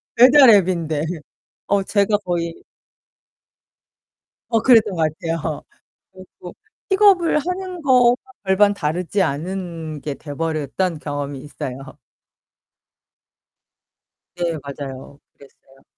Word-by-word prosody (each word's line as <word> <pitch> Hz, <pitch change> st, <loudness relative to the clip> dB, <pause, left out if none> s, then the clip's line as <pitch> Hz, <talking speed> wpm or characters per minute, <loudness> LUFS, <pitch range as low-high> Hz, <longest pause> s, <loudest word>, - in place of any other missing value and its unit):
배달 255 Hz, +2 st, +7 dB
앱인데. 170 Hz, -6 st, +2 dB, 0.7 s
어 200 Hz, -1 st, +2 dB
제가 205 Hz, +1 st, +1 dB
거의 170 Hz, -1 st, -3 dB, 1.9 s
어 225 Hz, -2 st, +2 dB
그랬던 225 Hz, -6 st, +4 dB
것 165 Hz, -, -2 dB, 0.2 s
같아요. 165 Hz, -2 st, -3 dB, 0.5 s
그래 185 Hz, 0 st, -13 dB
가지고 175 Hz, -, -11 dB, 0.3 s
픽업을 385 Hz, -5 st, +4 dB
하는 360 Hz, +2 st, -4 dB
거와 250 Hz, -3 st, +5 dB, 0.3 s
별반 200 Hz, +1 st, +3 dB
다르지 180 Hz, +3 st, -1 dB
않은 165 Hz, -1 st, -4 dB
게 145 Hz, -1 st, -5 dB
돼 145 Hz, -1 st, -9 dB
버렸던 160 Hz, +2 st, -2 dB
경험이 145 Hz, -2 st, -5 dB
있어요. 135 Hz, -2 st, -8 dB, 2.4 s
네 170 Hz, -2 st, -2 dB
맞아요. 140 Hz, 0 st, -8 dB, 0.2 s
그랬어요. 135 Hz, -1 st, -21 dB
175 Hz, 210 characters per minute, -20 LUFS, 150-215 Hz, 2.4 s, 배달